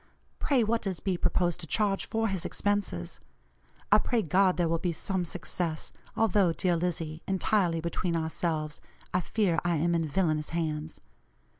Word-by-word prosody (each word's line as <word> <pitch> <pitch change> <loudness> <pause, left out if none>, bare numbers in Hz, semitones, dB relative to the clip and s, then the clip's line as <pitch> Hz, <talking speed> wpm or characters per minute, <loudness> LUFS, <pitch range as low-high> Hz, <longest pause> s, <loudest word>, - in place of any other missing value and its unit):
Pray, 265 -5 +3
what 230 +1 +1
does 190 -4 -3
B. 190 -2 0
propose 175 0 +1
to 165 - -10
charge 200 +2 +1
for 225 0 0
his 190 -4 -1
expenses? 205 - -1 0.7
I 210 - +8
pray 230 +1 +1
God 185 +2 +3
there 175 -2 +2
will 165 0 +1
be 175 - 0
some 180 +2 -2
success, 165 -1 -3 0.3
although, 200 -5 +3
dear 175 +1 +1
Lizzie, 165 -2 -2
entirely 190 -3 +2
between 170 +1 -1
ourselves, 160 -2 -2 0.3
I 180 - +2
fear 180 -2 +1
I 175 -1 +1
am 170 +3 +1
in 165 -1 +1
villanous 155 -2 0
hands. 155 -1 -3
175 Hz, 160 wpm, -29 LUFS, 165-195 Hz, 0.7 s, I